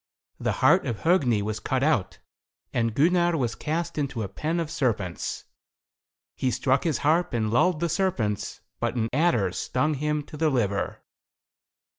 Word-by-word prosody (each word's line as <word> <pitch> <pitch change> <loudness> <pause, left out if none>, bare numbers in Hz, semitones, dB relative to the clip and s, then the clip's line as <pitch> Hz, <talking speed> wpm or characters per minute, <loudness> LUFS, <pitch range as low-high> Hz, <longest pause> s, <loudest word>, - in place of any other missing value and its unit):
The - - 0
heart - - +5
of 115 - -3
Hogni 135 - +3
was 110 +1 -3
cut 130 +3 -1
out, 135 -11 +1 0.6
and 115 -2 0
Gunnar 175 +3 +3
was 120 -5 0
cast 165 +1 -3
into 135 -6 -2
a - - -3
pen 155 - -2
of 160 -2 -3
serpents. 100 -9 -2 0.9
He 130 - 0
struck 130 +3 +1
his 160 -4 +1
harp 170 +2 +2
and 110 -2 0
lulled 160 +7 +2
the 170 - +2
serpents, 155 - -1 0.2
but - - -1
an 115 -2 0
adder 135 - +2
stung 130 +10 0
him 150 +1 -1
to 150 - -11
the 160 0 +2
liver. 105 -8 -1
140 Hz, 160 wpm, -26 LUFS, 115-160 Hz, 0.9 s, heart